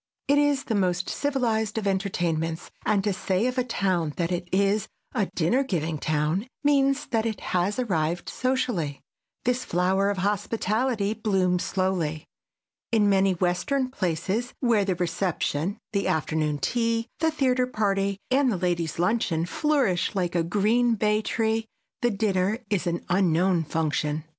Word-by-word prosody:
It 285 +1 +4
is 290 -1 +2
the 225 - -2
most 185 -3 0
civilized 230 -7 0
of 220 - -2
entertainments, 175 -4 -1 0.2
and 200 -2 +2
to 205 -1 +1
say 185 +3 0
of 255 0 0
a - - +2
town 185 -9 0
that 170 0 -1
it 175 0 -3
is 200 +2 +2 0.3
a 210 -6 +1
dinner 180 +11 +2
giving 165 - -2
town 155 - 0 0.2
means 280 -1 +3
that 225 -1 +1
it 220 -3 -3
has 185 +3 +1
arrived 175 -8 -1
socially. 245 - -1 0.4
This 250 +1 +1
flower 190 +3 +1
of 205 - -1
hospitality 210 +2 0
blooms 190 -5 +1
slowly. 180 -5 -1 0.7
In 215 -3 +4
many 195 -1 +3
western 195 - 0
places 190 +4 -2
where 230 -6 +2
the 190 -2 0
reception, 175 0 -1 0.2
the 200 -1 0
afternoon 155 -1 0
tea, 230 - 0
the 320 0 +3
theater 255 -5 +1
party 200 -4 0
and 265 -1 +3
the 195 - -1
ladies' 175 -3 -1
luncheon 175 -3 +1
flourish 255 - +1
like 180 -3 0
a 175 - +2
green 215 +7 +2
bay 210 0 +2
tree, 225 0 0 0.4
the 240 - +3
dinner 200 -1 +1
is 190 -3 0
an 170 0 -2
unknown 180 -1 +2
function. 155 -1 -1
195 Hz, 150 wpm, -26 LUFS, 175-230 Hz, 0.7 s, It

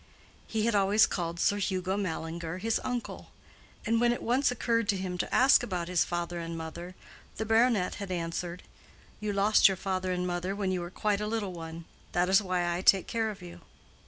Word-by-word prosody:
He 220 -1 -1
had 235 - +2
always 205 +2 +5
called 170 -2 -3
Sir 205 - +2
Hugo 190 -1 -1
Mallinger 165 -3 -4
his 220 +4 -1
uncle, 245 -2 -4 0.6
and 230 0 +2
when 240 0 +4
it 240 - -3
once 255 +4 +2
occurred 230 -2 0
to 200 - +2
him 185 -1 -4
to - - -2
ask 265 +3 +6
about 175 -3 -3
his 180 -1 +2
father 175 0 -3
and 165 0 -5
mother, 170 +3 -7 0.4
the 220 - -2
baronet 225 -3 +3
had 200 - -5
answered, 170 0 -4 0.6
"You 210 0 -2
lost 200 +2 +5
your 195 -1 0
father 185 -1 -2
and 180 0 -1
mother 180 +2 -2
when 200 -2 -1
you 185 -1 -1
were 175 - -5
quite 205 +2 -1
a 210 - -2
little 210 -4 -2
one; 165 -1 -8 0.3
that 175 +1 +2
is 195 +2 +5
why 180 -3 -1
I 175 - -3
take 190 0 +5
care 225 -2 -1
of 210 - -8
you." 85 0 -11
185 Hz, 205 wpm, -29 LUFS, 175-215 Hz, 0.6 s, ask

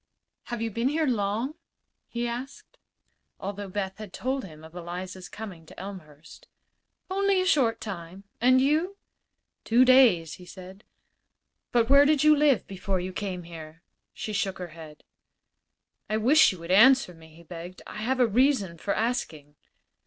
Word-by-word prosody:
"Have 240 -2 -4
you 225 - -2
been 230 +4 0
here 315 +2 0
long?" 225 +2 -1 0.5
he 240 0 -3
asked, 245 +3 -7 0.6
although 200 0 -5
Beth 195 0 -4
had 215 -3 -8
told 265 +6 -2
him 155 -4 -12
of 160 +1 -13
Eliza's 180 +1 -7
coming 200 -7 -9
to - - -13
Elmhurst. 165 -6 -11 0.6
"Only 395 0 +2
a 370 - +1
short 235 -10 +2
time. 185 -2 -8 0.2
And 255 +2 +5
you?" 315 +9 +1 0.7
"Two 240 +3 +4
days," 215 - +5
said 190 +1 -12
he. - - -39 0.8
"But 235 -2 +3
where 280 +2 +7
did 300 -1 +3
you 305 0 +7
live 290 -5 +3
before 195 0 -3
you 185 +1 -5
came 185 -3 -4
here?" 165 0 -11 0.3
She 215 - -6
shook 200 -2 -1
her 180 -1 -6
head. 155 -2 -12 1.1
"I 215 - +1
wish 265 +9 +5
you 185 - -8
would 170 +1 -5
answer 255 0 +6
me," 160 -1 -17
he 170 - -15
begged. 175 +2 -10
"I - - -9
have 250 +5 -1
a 250 - +6
reason 225 - +1
for 200 - -1
asking." 165 - -3
205 Hz, 160 wpm, -27 LUFS, 180-255 Hz, 1.1 s, where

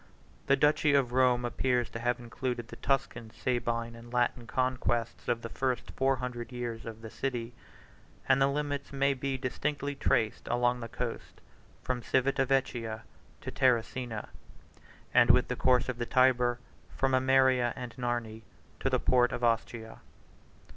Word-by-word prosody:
The 140 - +5
duchy 150 0 +3
of 130 -4 +2
Rome 125 -1 +3
appears 125 0 0
to 115 - -5
have 120 +1 0
included 120 0 -4
the - - -8
Tuscan, 125 -4 -1
Sabine, 115 -1 -2
and 115 +1 -12
Latin 120 -1 0
conquests, 125 -2 -1
of 115 0 0
the 115 - -5
first 130 0 -2
four 135 0 +1
hundred 125 -1 -5
years 120 -2 -5
of 110 0 -8
the 110 - -8
city, 120 -3 -3 0.7
and 135 - +4
the 135 - +5
limits 145 0 -2
may 140 0 +2
be 135 0 -3
distinctly 140 +2 -2
traced 115 -5 0
along 120 0 +1
the 115 - -5
coast, - - -5 0.4
from 125 -1 -2
Civita 135 +2 +1
Vecchia 120 -5 -1 0.4
to - - -5
Terracina, 120 -2 0 0.8
and - - +6
with - - +5
the - - -1
course 125 -1 +3
of 125 -2 -4
the 120 - -2
Tyber 125 -2 +3 0.4
from 135 -1 +2
Ameria 130 -1 +4
and 125 -2 -7
Narni 120 -3 -3 0.4
to - - 0
the - - +2
port 125 -1 +3
of 120 - -4
Ostia. 115 -1 -1
125 Hz, 155 wpm, -30 LUFS, 120-130 Hz, 0.8 s, and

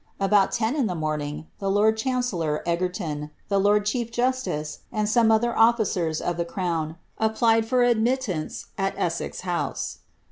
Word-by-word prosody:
* - - -39
About 205 -2 +4
ten 230 +3 0
in 275 -7 +1
the 180 - -2
morning, 155 -1 -3
the 195 - -1
lord 210 +2 +4
chancellor 220 - -1
Egerton, 170 -4 -2 0.2
the 200 -1 +2
lord 205 +1 +3
chief 230 +2 -1
justice, 240 -11 -1
and 215 -2 0
some 225 +1 +4
other 235 +2 +2
officers 210 -9 +2
of 175 -1 -2
the 170 - +1
crown, 170 -3 -2 0.2
s|>plied 225 +1 +3
for 250 +2 +2
admittance 235 - 0
at 195 0 -1
Elssez 170 -1 -2
House. 175 -2 -3
205 Hz, 155 wpm, -25 LUFS, 170-230 Hz, 0.2 s, About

